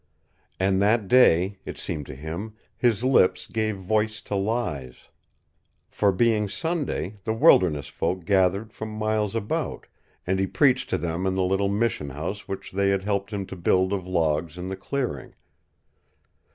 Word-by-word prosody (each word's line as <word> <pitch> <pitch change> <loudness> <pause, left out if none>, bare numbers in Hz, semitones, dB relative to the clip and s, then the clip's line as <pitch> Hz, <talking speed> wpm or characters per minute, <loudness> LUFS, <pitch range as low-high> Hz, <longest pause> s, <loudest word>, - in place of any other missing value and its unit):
And 95 0 +2
that 105 0 +2
day, 95 -5 +4
it - - -7
seemed 75 -2 -4
to - - -8
him, 85 +10 -6 0.2
his 120 -2 +1
lips 130 -8 +3
gave 110 -2 -2
voice 105 +3 0
to - - -6
lies. 95 - -3 0.8
For, 100 -1 +2
being 105 +1 +2
Sunday, 110 - -3
the 110 - -1
wilderness 75 -10 +4
folk 90 +4 -3
gathered 100 +3 +2
from 110 - -6
miles 110 -1 -1
about, 110 -2 -2 0.4
and 95 +1 0
he 95 - +1
preached 130 +3 +2
to - - +1
them 85 +3 -2
in 95 - 0
the 95 - +1
little 95 +2 +1
mission 100 -8 -1
house 80 +9 -5
which 95 -1 -6
they 100 +1 +1
had 100 -1 +1
helped 100 0 -1
him 100 -2 -3
to 95 - -8
build 95 +2 +2
of 95 -2 -3
logs 80 -2 0
in 90 +1 -5
the 95 - -3
clearing. 120 - -4
100 Hz, 165 wpm, -25 LUFS, 90-110 Hz, 0.8 s, day